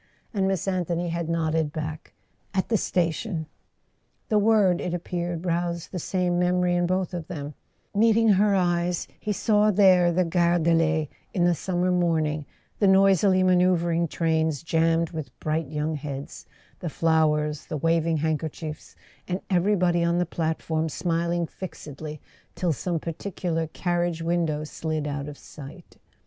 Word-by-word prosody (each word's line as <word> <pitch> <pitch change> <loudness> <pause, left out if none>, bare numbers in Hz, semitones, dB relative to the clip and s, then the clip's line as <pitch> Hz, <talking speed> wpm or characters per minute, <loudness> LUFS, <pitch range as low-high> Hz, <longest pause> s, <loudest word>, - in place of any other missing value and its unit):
and 195 -3 +1
Miss 190 -1 -1
Anthony 175 -2 -1
had 170 -1 -3
nodded 160 -2 0
back: 155 0 -6 0.4
"At 190 - 0
the 230 - +2
station." 170 -1 -1 0.8
The 215 - +4
word, 205 -4 +3
it 175 -1 -2
appeared, 175 0 -4
roused 170 -1 -2
the 180 - -3
same 175 0 0
memory 180 0 +2
in 175 0 +1
both 185 0 -1
of 170 -3 -5
them; 150 -4 -6 0.4
meeting 225 +1 +4
her 200 0 +4
eyes, 175 -1 0
he 215 - -3
saw 210 +1 +3
there 185 -3 +5
the 180 +1 +2
Gare 170 0 +2
de 170 0 +2
l'Est 160 -1 +2 0.3
in 175 -2 +3
the 175 - +4
summer 180 +2 -1
morning, 160 -4 0 0.3
the 200 - +4
noisily 190 0 +5
manoeuvring 175 -2 +3
trains 160 -1 0
jammed 165 0 +1
with 155 -4 -7
bright 155 0 -1
young 150 +2 -2
heads, 140 -2 -6 0.3
the 170 - -4
flowers, 155 -2 +1
the 155 - -3
waving 165 +1 +1
handkerchiefs, 155 0 -4 0.3
and 185 +1 -2
everybody 180 -2 +2
on 170 0 +2
the 180 - +2
plat¬ 160 -1 -2
form 160 0 -1
smiling 170 +1 -1
fixedly 155 -4 -8 0.4
till 175 -3 0
some 170 +4 -2
particular 165 0 -3
carriage 175 0 -1
win¬ 170 0 +1
dow 150 0 -2
slid 155 0 -3
out 145 -1 -3
of 145 -1 -8
sight. 150 +4 -12
170 Hz, 155 wpm, -25 LUFS, 160-180 Hz, 0.8 s, there